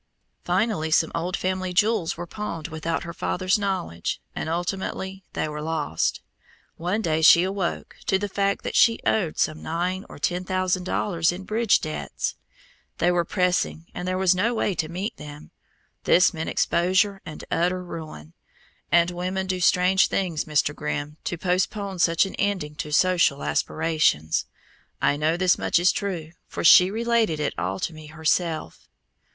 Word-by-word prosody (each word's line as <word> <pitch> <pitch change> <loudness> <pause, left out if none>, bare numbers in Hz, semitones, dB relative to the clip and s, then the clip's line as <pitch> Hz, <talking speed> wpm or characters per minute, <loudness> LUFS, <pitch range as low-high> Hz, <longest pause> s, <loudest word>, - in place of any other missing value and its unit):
Finally 205 -9 0
some 160 +1 +3
old 175 +2 -2
family 185 0 -2
jewels 205 -2 +1
were 175 - -5
pawned 170 -4 -5
without 160 +1 -3
her 170 - -7
father's 185 +4 0
knowledge, 185 - -2 0.2
and - - -3
ultimately 190 +2 -3
they - - -1
were 150 0 -5
lost. 155 - -1 0.5
One 185 +6 -2
day 160 -2 +1
she 170 +2 +7
awoke 190 -1 -3
to 190 - +3
the 205 +1 -3
fact 200 0 -1
that - - -4
she 230 -1 +5
owed 180 -8 +1
some 155 0 0
nine 180 +4 -2
or - - -10
ten 175 +5 -1
thousand 185 0 -1
dollars 170 -4 +1
in 180 +2 -7
bridge 220 +2 +2
debts. 155 - -4 0.6
They 175 - +2
were 175 -1 +2
pressing 180 -2 -1
and 180 - -5
there 185 0 0
was 190 -1 +4
no 220 +6 0
way 205 - 0
to 160 -2 -2
meet 185 +6 -4
them. 150 0 -10 0.5
This 185 +2 +5
meant 160 -1 -4
exposure 190 +3 +1
and 155 -2 -9
utter 180 +2 0
ruin, 155 - -9 0.6
and 170 +1 +4
women 185 +2 -2
do 185 -1 -2
strange 180 +2 +4
things, 175 -5 -1
Mr. 150 -1 +1
Grimm, 150 0 -4
to 175 - -2
postpone 190 +2 -1
such 165 +2 +4
an 195 - -7
ending 190 -7 -1
to 150 - -5
social 170 -4 +3
aspirations. 155 - +1 0.5
I 145 - +2
know 155 +3 +1
this 180 -1 +3
much - - +2
is 175 +1 +4
true, 175 -6 -4 0.2
for - - -5
she 180 +2 +8
related 225 -6 +1
it 150 - -1
all 95 +3 -3
to 175 - -2
me 155 -1 -11
herself. 160 - -2
175 Hz, 165 wpm, -24 LUFS, 160-190 Hz, 0.6 s, she